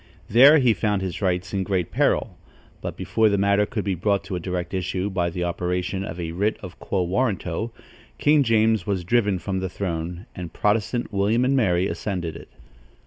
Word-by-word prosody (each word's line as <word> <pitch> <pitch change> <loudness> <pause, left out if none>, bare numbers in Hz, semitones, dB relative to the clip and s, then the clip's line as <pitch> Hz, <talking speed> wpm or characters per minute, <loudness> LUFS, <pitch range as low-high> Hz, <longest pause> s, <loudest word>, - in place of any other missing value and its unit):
There 135 +8 +7
he 125 -5 +4
found 105 -3 0
his 95 0 -4
rights 90 0 -1
in 100 - 0
great 95 -3 -1
peril; - - +1 0.5
but - - -5
before 110 -1 +2
the 100 - +1
matter 100 +1 +2
could 110 -4 -3
be 100 - 0
brought 100 +3 0
to 95 0 -5
a - - -2
direct 90 +1 -4
issue 95 +1 -2
by 90 -2 0
the 90 +1 -3
operation 90 +2 -2
of 90 -2 -6
a 85 -1 -3
writ 100 +6 0
of 90 -3 -9
quo 95 -2 -1
warranto, 100 +1 -1 0.5
King 150 0 +4
James 110 -3 +2
was 95 -3 -1
driven 105 0 +2
from 95 +1 -3
the 95 0 -3
throne, 85 0 -4
and 85 -3 -7
Protestant 110 +3 0
William 105 +5 +2
and 135 +2 +2
Mary 95 -8 +2
ascended 90 -7 -3
it. - - -11
95 Hz, 195 wpm, -24 LUFS, 90-110 Hz, 0.5 s, There